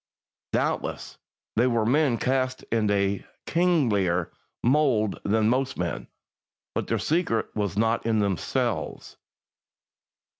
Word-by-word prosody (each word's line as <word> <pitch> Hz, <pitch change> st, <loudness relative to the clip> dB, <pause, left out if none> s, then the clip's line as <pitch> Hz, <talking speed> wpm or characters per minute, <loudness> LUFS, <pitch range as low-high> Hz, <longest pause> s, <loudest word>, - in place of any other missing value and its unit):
Doubtless, -, -, -2 dB, 0.4 s
they 120 Hz, +3 st, +4 dB
were 115 Hz, -3 st, +1 dB
men 135 Hz, 0 st, +3 dB
cast 130 Hz, 0 st, 0 dB
in 110 Hz, -2 st, +2 dB
a 100 Hz, -1 st, +1 dB, 0.2 s
kinglier 110 Hz, -, +2 dB, 0.3 s
mould 120 Hz, -6 st, +2 dB
than 110 Hz, +1 st, +2 dB
most 130 Hz, +3 st, 0 dB
men; 85 Hz, -1 st, -3 dB, 0.7 s
but -, -, -2 dB
their -, -, +1 dB
secret 155 Hz, -9 st, 0 dB
was 100 Hz, -3 st, -2 dB
not 115 Hz, +1 st, +2 dB
in 115 Hz, -1 st, +1 dB
themselves. 100 Hz, -5 st, -2 dB
115 Hz, 110 wpm, -26 LUFS, 100-130 Hz, 0.7 s, they